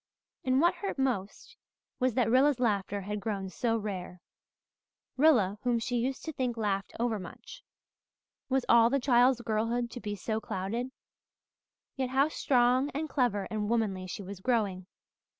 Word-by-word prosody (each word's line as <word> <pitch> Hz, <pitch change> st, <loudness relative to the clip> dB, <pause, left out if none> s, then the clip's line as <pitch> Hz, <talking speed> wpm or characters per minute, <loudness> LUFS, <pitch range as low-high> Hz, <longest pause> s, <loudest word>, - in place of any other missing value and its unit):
And 260 Hz, 0 st, +2 dB
what 345 Hz, +3 st, +4 dB
hurt 395 Hz, -, -5 dB
most 260 Hz, -, -2 dB, 0.4 s
was 255 Hz, -3 st, +1 dB
that 250 Hz, -4 st, +2 dB
Rilla's 260 Hz, +3 st, +4 dB
laughter 205 Hz, -4 st, 0 dB
had 210 Hz, +2 st, -4 dB
grown 200 Hz, -3 st, -3 dB
so 230 Hz, +4 st, 0 dB
rare 185 Hz, -4 st, -5 dB, 1.0 s
Rilla 235 Hz, -9 st, +4 dB
whom 245 Hz, -1 st, +1 dB
she 245 Hz, +2 st, -2 dB
used 260 Hz, +3 st, -2 dB
to 320 Hz, -, -4 dB
think 250 Hz, -3 st, -2 dB
laughed 200 Hz, -3 st, -2 dB
over 230 Hz, -3 st, 0 dB
much. 180 Hz, -, -10 dB, 0.9 s
Was 265 Hz, -1 st, +1 dB
all 230 Hz, 0 st, +6 dB
the 275 Hz, +2 st, +1 dB
child's 245 Hz, -1 st, +4 dB
girlhood 230 Hz, +2 st, -1 dB
to -, -, -7 dB
be 210 Hz, -3 st, -4 dB
so 220 Hz, +2 st, -3 dB
clouded? 220 Hz, +7 st, -3 dB, 1.1 s
Yet 260 Hz, -2 st, -2 dB
how 270 Hz, +3 st, +3 dB
strong 255 Hz, -1 st, +2 dB
and 310 Hz, +2 st, -2 dB
clever 240 Hz, -7 st, 0 dB
and 210 Hz, -1 st, -2 dB
womanly 205 Hz, -5 st, 0 dB
she 200 Hz, -, -6 dB
was 195 Hz, 0 st, -8 dB
growing! 195 Hz, -5 st, 0 dB
235 Hz, 155 wpm, -30 LUFS, 205-255 Hz, 1.1 s, all